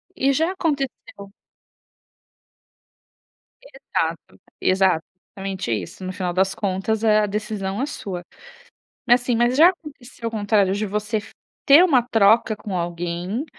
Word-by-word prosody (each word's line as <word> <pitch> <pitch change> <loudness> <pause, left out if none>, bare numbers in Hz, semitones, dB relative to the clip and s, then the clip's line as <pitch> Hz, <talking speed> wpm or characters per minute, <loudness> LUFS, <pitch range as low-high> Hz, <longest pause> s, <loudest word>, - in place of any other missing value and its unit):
E 270 +1 +2
já 320 +6 +1
aconteceu 275 - -4 2.3
Exato, - - -5 0.9
exatamente 195 -8 -5
isso. 165 - -4
No 185 - -4
final 185 -2 -3
das 190 +2 +1
contas, 205 +3 -2
eh, 215 -1 +4
a 210 - +2
decisão 210 0 -3
é - - +1
sua. 190 -11 -6 0.8
Mas, 245 0 +4
assim, 245 -1 0
mas 240 +2 +2
já 325 +4 +8
aconteceu 275 -9 -9
o - - -8
contrário? 205 -3 +1
De 210 +1 -2
você 210 +2 -2 0.5
ter 290 +6 +8
uma 275 -9 +4
troca 225 -1 +3
com 200 -2 -5
alguém 175 - -3
215 Hz, 130 wpm, -22 LUFS, 195-255 Hz, 2.3 s, já